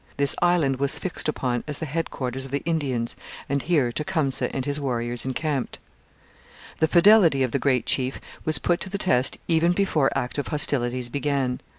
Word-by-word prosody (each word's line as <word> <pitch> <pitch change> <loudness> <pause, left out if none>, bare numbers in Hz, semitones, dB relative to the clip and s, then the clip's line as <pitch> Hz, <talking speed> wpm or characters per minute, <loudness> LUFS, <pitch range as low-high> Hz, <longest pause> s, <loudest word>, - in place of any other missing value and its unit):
This 140 0 +4
island 170 -7 +2
was 140 0 +1
fixed 175 -4 -1
upon 125 -5 -2
as 150 -1 -2
the 160 - -4
headquarters 135 -4 -3
of 135 - -7
the 140 +2 -3
Indians, 135 -8 -1 0.3
and 140 0 0
here 145 -8 +1
Tecumseh 150 -2 -1
and 135 -1 -3
his 145 +1 0
warriors 120 -3 -2
encamped. 135 0 -2 1.0
The 160 - +3
fidelity 170 -5 +5
of 130 - -1
the - - 0
great 130 -3 +1
chief 130 0 0 0.2
was 155 -1 0
put 175 +4 0
to 190 - -5
the 200 - -3
test 135 -10 +1
even 170 +1 +3
before 170 -8 +2
active 130 +3 -2
hostilities 130 -5 0
began. 140 -2 -1
140 Hz, 175 wpm, -24 LUFS, 130-160 Hz, 1.0 s, fidelity